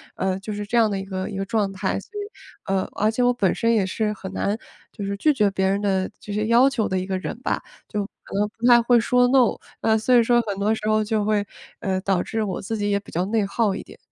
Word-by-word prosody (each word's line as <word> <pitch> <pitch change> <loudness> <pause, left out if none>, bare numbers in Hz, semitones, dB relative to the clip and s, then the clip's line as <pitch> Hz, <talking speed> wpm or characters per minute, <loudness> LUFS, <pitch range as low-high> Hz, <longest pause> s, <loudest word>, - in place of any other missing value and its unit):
呃， 190 0 -1
就 210 +2 -6
是 205 0 -4
这 235 +3 0
样 225 -2 +5
的 200 - -1
一 - - -4
个 190 -1 -4
一 200 - -5
个 195 - -2
状 205 -2 0
态。 195 0 -2
所 - - -15
以， - - -3 0.4
呃， 195 -1 0
而 210 +1 +1
且 245 +3 0
我 245 0 +4
本 200 -7 +1
身 230 0 +2
也 210 -4 +2
是 210 +3 -1
很 190 -2 -8
难 200 +2 -1 0.3
就 205 - -6
是 200 0 -2
拒 305 +8 +3
绝 210 -6 +3
别 190 0 0
人 200 +1 +1
的， 190 -2 0
这 205 - -7
些 210 +1 0
要 240 +4 +5
求 235 -6 -1
的 190 - 0
一 185 - -3
个 190 0 -2
人 205 - -5
吧， - - -1 0.3
就 210 -2 -2 0.2
可 - - -9
能 210 - +2
不 235 +2 +1
太 240 -1 +7
会 235 0 +4
说 250 +2 +3
NO， 255 -2 +3 0.2
呃， 220 0 +3
所 220 +4 +1
以 240 - +7
说 240 +1 +4
很 200 -3 -4
多 210 +2 +2
时 215 -1 -5
候 215 0 +3
就 215 0 0
会， 210 -1 +1 0.3
呃， 190 -2 -1
导 190 -2 +1
致 220 -1 -2
我 190 -3 -3
自 225 +4 -3
己 205 0 -1
也 200 - +2
比 - - -15
较 175 - 0
内 215 +1 +1
耗 200 +1 +1
一 - - -5
点。 - - -15
210 Hz, 305 characters per minute, -23 LUFS, 195-230 Hz, 0.4 s, 太